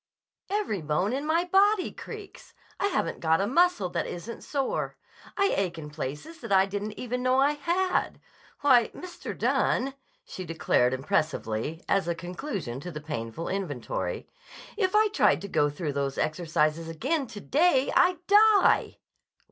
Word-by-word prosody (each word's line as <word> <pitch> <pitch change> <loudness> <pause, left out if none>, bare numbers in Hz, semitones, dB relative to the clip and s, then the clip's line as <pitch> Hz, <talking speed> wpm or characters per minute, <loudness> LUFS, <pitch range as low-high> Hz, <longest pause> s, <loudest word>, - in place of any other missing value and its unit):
"Every 395 - -1
bone 160 +8 0
in 280 +3 -2
my 330 +2 +2
body 390 +2 +3
creaks. 430 -3 -10 0.2
I 400 - +2
haven't 260 - -1
got 160 0 +2
a 195 - +1
muscle 290 - +3
that - - -2
isn't 195 +7 -7
sore. 275 -3 -2 0.4
I 395 0 +3
ache 185 -4 -1
in 150 -2 -8
places 150 - -6
that 230 -4 -7
I 190 0 +5
didn't 205 +2 -5
even 250 0 -3
know 255 +1 +3
I 280 +2 +4
had. 345 +6 0 0.4
Why, 255 -5 +5
Mr. 360 -1 -7
Dunne," 265 +2 +1 0.3
she 185 - -7
declared 155 -6 +1
impressively, 145 +1 -2
as 195 -3 +1
a 170 - 0
conclusion 175 - -5
to 180 - -7
the 150 -3 -6
painful 145 -1 -5
inventory, 170 -11 -3 0.5
"if 385 -2 0
I 430 0 +5
tried 420 - +3
to 200 - -5
go 145 -6 +2
through 145 0 -4
those 140 -1 -2
exercises 155 0 0
again 265 - -1
to 215 - -9
day, 280 - +2
I'd 360 0 +3
die!" 415 +1 +5
200 Hz, 155 wpm, -27 LUFS, -, 0.5 s, I